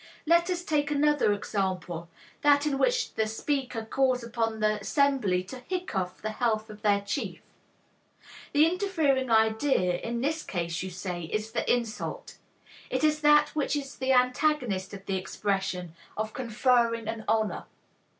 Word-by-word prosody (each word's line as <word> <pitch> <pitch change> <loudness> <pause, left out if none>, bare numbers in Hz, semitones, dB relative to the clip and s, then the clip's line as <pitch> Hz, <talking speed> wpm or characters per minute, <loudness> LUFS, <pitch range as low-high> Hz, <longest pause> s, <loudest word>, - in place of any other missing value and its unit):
Let 340 +2 +4
us 355 -1 -1
take 295 -3 0
another 295 -5 +3
example, 185 -4 -2 0.3
that 290 0 +4
in 280 -3 0
which - - +1
the 220 - 0
speaker 250 0 -2
calls 255 +1 +1
upon 225 -1 -2
the 215 0 +1
assembly 255 -8 +2
'to 255 +8 -9
hiccough 210 - -3
the 215 - -2
health 220 -1 -1
of 210 0 -12
their 205 -2 +3
chief.' 200 - -4 1.1
The 300 +1 +5
interfering 325 -8 +1
idea 220 -5 +2
in 235 +3 -3
this 310 +4 0
case, 170 0 -3
you 190 - -4
say, 180 -1 -5
is 215 +6 -3
the 235 - 0
insult. 235 -2 -3 0.5
It - - -1
is 305 0 +3
that 295 0 +5
which 295 -1 -1
is 280 -1 -4
the 260 0 0
antagonist 250 -6 +2
of 195 0 -12
the 195 - -1
expression 190 -2 -2 0.2
of 215 0 -3
conferring 235 -1 +1
an 225 0 -4
honor. 220 -1 0
230 Hz, 150 wpm, -28 LUFS, 205-285 Hz, 1.1 s, The